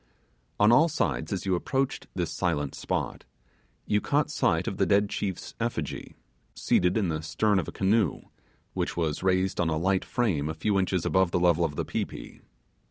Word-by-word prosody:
On 105 +2 +6
all 155 +8 +6
sides 110 - -1
as 100 -1 -3
you 95 - +1
approached 135 +9 -1
this 85 -3 -2
silent 75 -6 -1
spot - - -3 0.6
you 105 0 +1
caught 145 0 +1
sight - - +1
of - - -3
the - - +2
dead 100 0 +3
chief's 95 -3 -4
effigy, 115 -11 -4 0.4
seated 90 +3 +2
in 100 -5 +1
the 80 -1 -2
stern 100 +5 +1
of 85 - -3
a - - -5
canoe, 100 -2 +1 0.5
which - - -2
was 80 -3 -1
raised 95 0 +1
on 85 - +1
a 80 - 0
light 95 +3 +1
frame 90 - 0
a 80 - -4
few 100 +4 +1
inches 95 -2 0
above 95 -1 +3
the 90 - 0
level 85 -1 +3
of 75 -3 -1
the - - -2
pi - - -1
pi. - - -10
95 Hz, 190 wpm, -27 LUFS, 85-105 Hz, 0.6 s, On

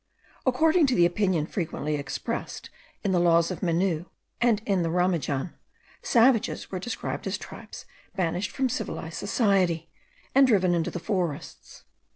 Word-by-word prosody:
According 315 +5 +4
to 255 - +1
the 175 - +5
opinion 175 -3 +1
frequently 160 -4 -3
expressed 145 -1 -4 0.3
in 200 - +1
the 180 - +3
laws 170 0 +4
of 185 - -5
Menou 175 -1 0 0.3
and 235 -3 +3
in 195 -3 +1
the 165 - 0
Ramajan, 170 -4 0 0.5
savages 235 -2 +2
were 185 -2 -4
regarded 240 - -4
as - - -1
tribes - - -10 0.3
banished 180 0 -1
from 265 - 0
civilized 250 - -4
society, 180 - +1 0.4
and 270 0 +6
driven 185 -7 +3
into 170 -2 0
the 175 - -5
forests. 175 -6 -4
185 Hz, 145 wpm, -26 LUFS, 170-220 Hz, 0.5 s, and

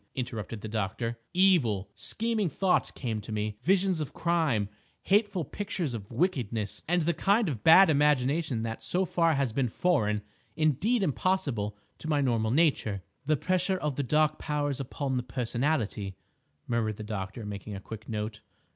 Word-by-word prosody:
interrupted 115 -4 -4
the 110 - -5
doctor. 110 +2 -2
"Evil, 130 - +3
scheming 220 - -1
thoughts 185 +5 +2
came 115 -5 -4
to 110 - -9
me, 105 0 -2
visions 190 +2 +2
of 150 - -5
crime, 160 -12 +1 0.4
hateful 200 -4 +2
pictures 175 -5 -3
of 105 -4 -7
wickedness, 115 - -1
and 175 0 +2
the 170 +2 +2
kind 200 +6 +2
of 120 -9 -3
bad 190 +4 +9
imagination 145 -3 +2
that 115 0 -4
so 185 +2 0
far 165 -2 +2
has 135 -5 0
been 125 -1 +1
foreign, 105 - +1 0.3
indeed 160 - +2
impossible, 130 - 0 0.2
to 160 - -6
my 150 -2 +2
normal 115 -5 +1
nature—" 120 - +2 0.2
"The 155 -1 +3
pressure 185 +3 +1
of 150 -5 -2
the 145 - 0
Dark 155 +3 +2
Powers 145 -2 -1
upon 135 0 -2
the - - +1
personality," 120 -5 -1 0.5
murmured 110 -3 -1
the 110 - -6
doctor, 105 +1 -5
making 100 0 -6
a - - -5
quick 110 +2 -9
note. 105 0 -3
135 Hz, 160 wpm, -29 LUFS, 110-170 Hz, 0.5 s, bad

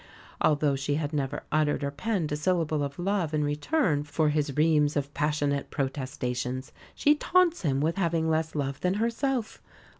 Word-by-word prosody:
Although 145 -2 +3
she 140 +1 -1
had 150 0 -2
never 145 0 -2
uttered 150 -1 +1
or 140 - -1
penned 175 +1 -2
a - - +1
syllable 160 -1 0
of 140 0 -3
love 175 -4 0
in 150 - +1
return 150 - +1
for 150 +1 +1
his 150 -2 -1
reams 150 -1 +3
of 145 0 -2
passionate 145 -1 0
protestations, 130 -2 -3 0.2
she 295 - +4
taunts 345 +3 +2
him 140 -6 0
with 165 +4 0
having 165 -3 +1
less 160 0 0
love 140 -2 -2
than 180 +1 +1
herself! 235 +2 -1
150 Hz, 170 wpm, -28 LUFS, 145-170 Hz, 0.2 s, she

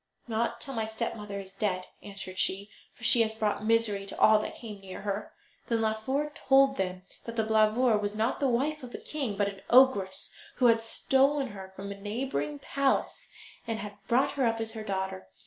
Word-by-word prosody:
"Not 230 0 -1
till 275 - -5
my 225 -3 -1
stepmother 220 -2 -4
is 190 -1 -9
dead," 190 -2 -1 0.2
answered 195 -2 -7
she, 200 +2 0 0.2
"for - - -18
she 235 0 +7
has 220 -1 0
brought 210 -1 -1
misery 215 -3 +2
to - - -8
all 215 0 +6
that - - -5
came 215 -4 -8
near 190 0 -8
her." 205 +1 -3 0.4
Then 230 -1 +1
Laufer 260 +7 -1
told 270 0 +4
them 185 -1 -2 0.2
that 230 - -6
Blauvor 220 +1 +3
was 205 0 -2
not 220 +2 0
the 280 - +2
wife 285 +6 0
of 250 -2 -8
a - - -4
king, 270 -10 -4
but 205 -1 +2
an 195 -1 -7
ogress 235 -7 +4 0.2
who 255 - +1
had 230 -1 +5
stolen 270 +4 +2
her 190 -2 -9
from 200 +1 -6
a 200 0 -9
neighbouring 205 - -3
palace 275 - -1 0.4
and 225 -1 -1
had 205 -1 -6
brought 250 +3 +3
her 270 -4 +1
up 225 0 0
as 225 0 -2
her 220 -1 -6
daughter. 190 - -3
220 Hz, 200 wpm, -29 LUFS, 200-240 Hz, 0.4 s, she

